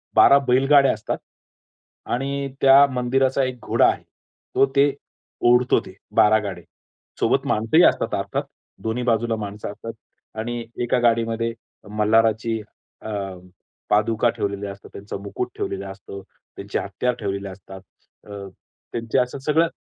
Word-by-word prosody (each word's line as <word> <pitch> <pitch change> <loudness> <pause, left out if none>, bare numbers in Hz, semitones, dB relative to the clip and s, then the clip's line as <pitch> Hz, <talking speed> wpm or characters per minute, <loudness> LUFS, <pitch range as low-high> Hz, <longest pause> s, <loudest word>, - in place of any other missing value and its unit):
12 140 - +8
बैलगाड्या 135 +2 +5
असतात. 110 - -4 0.9
आणि 140 +2 -2
त्या 135 +1 +8
मंदिराचा 130 +2 +1
एक 130 -1 -3
घोडा - - +3
आहे, - - -3 0.5
तो - - +6
ते 140 0 +4 0.6
ओढतो 125 +1 +4
ते 95 - -11 0.2
12 110 +1 +5
गाडे. 100 -4 -5 0.6
सोबत - - +2
माणसंही 115 +11 +3
असतात - - +2
अर्थात. - - -2 0.4
दोन्ही 115 +2 -2
बाजूला 115 -1 +1
माणसं 105 -1 -6
असतात. 115 +2 -8 0.5
आणि 120 +2 -3 0.2
एका 125 +1 +1
गाडीमध्ये 115 0 +1 0.4
मल्हाराची 110 +1 +2 0.4
अ, - - -8 0.8
पादुका 110 +2 +2
ठेवलेल्या 100 0 -3
असतात, 100 - -13
त्यांचा 100 0 -7
मुकूट 110 +5 -4
ठेवलेलं 100 0 -4
असतं, 100 0 -10 0.3
त्यांची - - -4
हत्यार 125 0 -1
ठेवलेले 100 -1 -3
असतात. 95 0 -11 0.5
अ, 105 - -11 0.6
त्यांचे 115 +2 -2
असं 125 +2 -1
सगळं 155 +4 +2
115 Hz, 130 wpm, -22 LUFS, 105-125 Hz, 0.9 s, 12